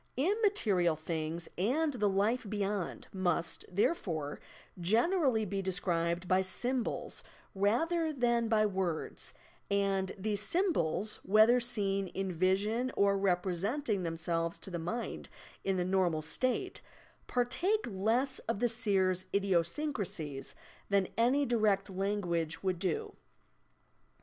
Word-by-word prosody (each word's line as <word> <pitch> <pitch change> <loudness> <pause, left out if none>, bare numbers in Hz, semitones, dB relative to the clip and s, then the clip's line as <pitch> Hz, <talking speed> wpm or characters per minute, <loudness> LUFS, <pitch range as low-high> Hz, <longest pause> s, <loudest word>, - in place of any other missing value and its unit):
Immaterial 275 - +2
things 160 +1 -3
and 290 - +1
the 210 -5 +1
life 205 +3 +1
beyond 205 -2 -2
must, 180 -3 0
therefore, 175 - -1 0.4
generally 235 - +2
be 195 0 -2
described 175 -2 -1
by 185 +1 +4
sjTnbols 240 +6 -1 0.3
rather 315 - +1
than 240 -4 +1
by 220 -1 +3
words, 185 -5 -3 0.3
and 195 -1 +1
these 205 +1 -1
symbols 215 - +1
(whether 220 +5 +5
seen 200 -5 0
in 190 +1 -3
vision 200 +8 +1
or 200 0 +4
representing 195 - 0
themselves 165 0 -2
to 195 - -9
the 170 - -3
mind 200 +9 -4 0.3
in 195 -1 0
the 180 - 0
normal 180 -4 +1
state) 255 - -1 0.5
partake 350 - +1
lesa 230 +7 0
of 230 - +1
the 240 +3 +1
seer's 195 -5 +2
idiosyncrasies 180 - -1 0.3
than 200 -2 +2
any 255 +5 +3
direct 215 -5 +1
language 185 -5 -1
would 185 -2 0
do. 185 -4 -2
200 Hz, 115 wpm, -32 LUFS, 180-235 Hz, 0.5 s, whether